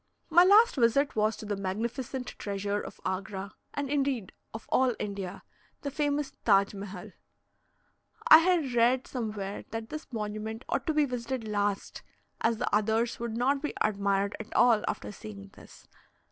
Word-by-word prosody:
My 345 +2 +8
last 420 +2 +6
visit 260 +4 +3
was 215 0 +1
to - - -8
the 205 -1 -2
magnificent 230 +7 -3
treasure 200 0 -2
of - - -9
Agra, 190 +1 -4 0.2
and, 285 0 -2
indeed, 270 -7 -1 0.2
of 220 - -9
all 255 -3 +3
India 195 -2 -5 0.4
the 280 - -3
famous 290 0 -1
Taj 200 -2 +4
Mehal. 200 0 -8 1.2
I 315 - +11
had 330 -6 +1
read 240 +2 +3
somewhere 210 -5 -4
that 225 0 -5
this 310 -1 -7
monument 215 +1 -4
ought - - -2
to 315 - +2
be 300 -1 +4
visited 245 -2 -4
last, 205 -1 -2 0.4
as 225 0 +2
the - - 0
others 220 +3 +1
would 230 -1 -3
not 270 +3 +1
be 300 - -3
admired 200 -1 +1
at 220 +1 -8
all 235 -3 +5
after 105 - -3
seeing 100 -2 -10
this. - - -16
225 Hz, 160 wpm, -29 LUFS, 200-265 Hz, 1.2 s, I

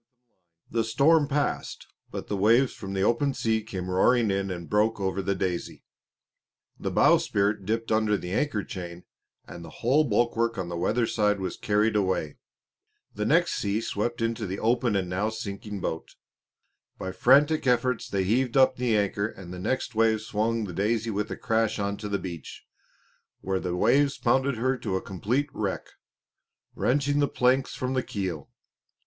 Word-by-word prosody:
The 115 -1 +1
storm 145 +7 +3
passed; 145 -1 -2 0.2
but - - -6
the 105 - -2
waves 115 +7 +3
from 95 -1 -7
the 95 - +1
open 130 +5 +1
sea 110 -1 0
came 95 -3 -6
roaring 110 +4 +3
in 95 0 -1
and 85 -3 -5
broke 105 +1 +1
over 95 0 -1
the 100 +1 -1
Daisy. 90 -2 -3 1.0
The - - -2
bowsprit 100 -1 +2
dipped 115 +1 -1
under 110 -1 +2
the 90 - -7
anchor 110 -1 0
chain, 90 -1 -7 0.4
and 85 - -9
the 80 - -9 0.2
whole 140 +6 +4
bulwark 115 -1 +1
on 90 -2 -3
the 85 - -4
weatherside 105 +1 +1
was 95 -1 -3
carried 105 +1 +1
away. 95 -7 0 0.8
The - - -2
next - - +3
sea 100 +1 -1
swept 115 +1 -2
into 115 -2 -2
the 95 +2 -4
open 115 0 +1
and 95 -2 0
now 95 +4 -1
sinking 105 -2 -6
boat. 80 - -4 0.8
By 95 - -4
frantic 145 +7 +4
efforts 125 0 +1
they 95 -1 0
heaved 125 +6 +1
up 130 -1 +5
the 120 -3 +1
anchor 100 0 0
and 95 -5 -10
the 90 - -7
next 125 +5 -2
wave 110 -1 +2
swung 110 +1 -1
the 95 -4 -5
Daisy 110 +4 0
with 105 0 -2
a - - -5
crash 115 -1 0
onto 100 0 -3
the 100 - 0
beach, 85 -6 -8 0.8
where 95 -1 -1
the 90 -1 -3
waves 140 +9 +3
pounded 135 +2 +1
her 130 +3 0
to 100 -4 -2
a 95 - -1
complete 125 - -2
wreck, 100 -3 -3 0.8
wrenching 145 +2 +1
the 145 - +3
planks 130 +1 +1
from 130 0 -2
the 130 - +1
keel. 95 - -4
110 Hz, 170 wpm, -26 LUFS, 95-120 Hz, 1.0 s, up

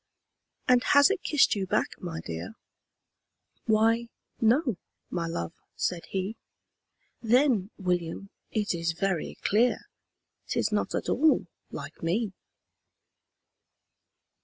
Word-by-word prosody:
"And 250 -1 +5
has 285 +5 +6
it 390 - -1
kissed 300 -2 +4
you 195 -2 -2
back, - - +1
my 165 -2 -5
dear?" 85 - -6 1.1
"Why 225 +1 +3 0.3
no 240 - +3 0.3
my 170 -2 -1
love," 85 - -3 0.2
said 175 -2 -2
he. 195 +3 -3 0.8
"Then, 235 -4 +3
William, 180 0 -2 0.2
it 210 -4 0
is 165 -1 -1
very 180 -1 -2
clear 230 +4 +3 0.7
'Tis - - 0
not - - 0
at - - -2
all 315 0 +3 0.2
LIKE - - -8
ME!" 190 +5 0
205 Hz, 110 wpm, -28 LUFS, 175-235 Hz, 1.1 s, has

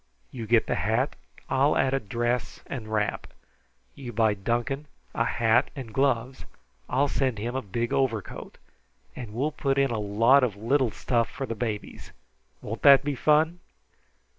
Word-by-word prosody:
You 115 -3 -6
get 115 0 +4
the - - -1
hat. - - 0 0.3
I'll 140 +3 +2
add 135 0 +2
a 135 - +2
dress 120 +3 -2
and 125 -6 -6
wrap. 105 -1 -1 0.7
You 130 -4 -8
buy 110 -1 +2
Duncan 120 +8 -2 0.3
a 115 - +1
hat 115 0 +2
and 125 -6 -8
gloves. 130 -2 0 0.5
I'll 135 +3 +2
send 130 -4 -1
him 120 +4 -4
a 130 - -1
big 115 +2 -3
overcoat, 115 -6 -2 0.6
and 120 -4 -7
we'll 145 +6 0
put 140 -2 -1
in 135 -2 +2
a 115 - -1
lot 115 +7 +4
of 115 -6 0
little 120 +5 +1
stuff 115 +1 -1
for 135 - -5
the 115 - -4
babies. 110 -2 -5 0.5
Won't 115 +2 -5
that 140 -1 +7
be 145 0 -1
fun?" 155 +5 +2
120 Hz, 165 wpm, -26 LUFS, 115-135 Hz, 0.7 s, that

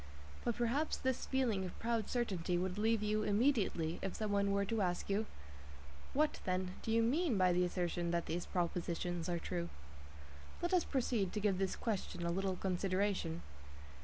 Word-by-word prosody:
But 235 - 0
perhaps 245 +6 +1
this 260 -1 -1
feeling 245 -8 +1
of 180 - -6
proud 230 -2 -1
certainty 185 -8 0
would 185 +2 -1
leave 220 0 +2
you 215 0 +1
immediately 205 - +2
if 190 - -3
some 215 -1 -2
one 200 0 +2
were 200 0 +2
to 225 +1 0
ask 180 +1 0
you: 215 +2 +1 0.9
"What, 300 +2 +2
then, 185 0 -1
do 225 - -2
you 230 0 +4
mean 275 - +2
by 185 -1 +4
the 180 +1 +3
assertion 175 -1 -1
that 170 0 0
these 175 +1 -3
propositions 175 -1 -1
are 175 - +1
true?" 170 0 -3 0.9
Let 345 +2 -1
us 360 -3 +4
proceed 235 -8 0
to 210 - -1
give 200 -3 +1
this 190 -1 0
question 200 -6 -2
a 170 - +1
little 190 +1 0
consideration. 185 -2 0
195 Hz, 175 wpm, -36 LUFS, 180-230 Hz, 0.9 s, you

